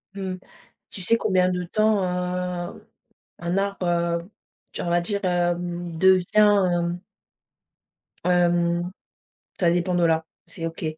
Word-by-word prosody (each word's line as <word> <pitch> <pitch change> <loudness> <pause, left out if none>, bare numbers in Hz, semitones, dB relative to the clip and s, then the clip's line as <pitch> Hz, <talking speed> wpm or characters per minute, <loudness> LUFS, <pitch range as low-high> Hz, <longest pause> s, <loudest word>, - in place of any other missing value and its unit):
Mmh. 190 -2 -4 0.6
Tu 190 - -3
sais 230 +6 +3
combien 185 -3 +2
de 180 0 -2
temps, 215 +2 +2
heu, 180 -1 -3 0.5
un 175 +3 -1
arbre, 195 -2 -1
heu, 170 +1 0 0.4
tu - - -4
on 170 - -2
va 175 0 +3
dire, 200 +3 -2
hem, 175 -1 -1
devient, 185 +1 +3
hem 180 -4 +3 1.3
Hem, 175 -1 +2 0.7
ça 170 -2 +4
dépend 175 +1 0
de 175 - +2
l'arbre, 160 0 +1 0.2
c'est 165 0 -6
OK 165 0 -8
175 Hz, 130 wpm, -24 LUFS, 170-185 Hz, 1.3 s, ça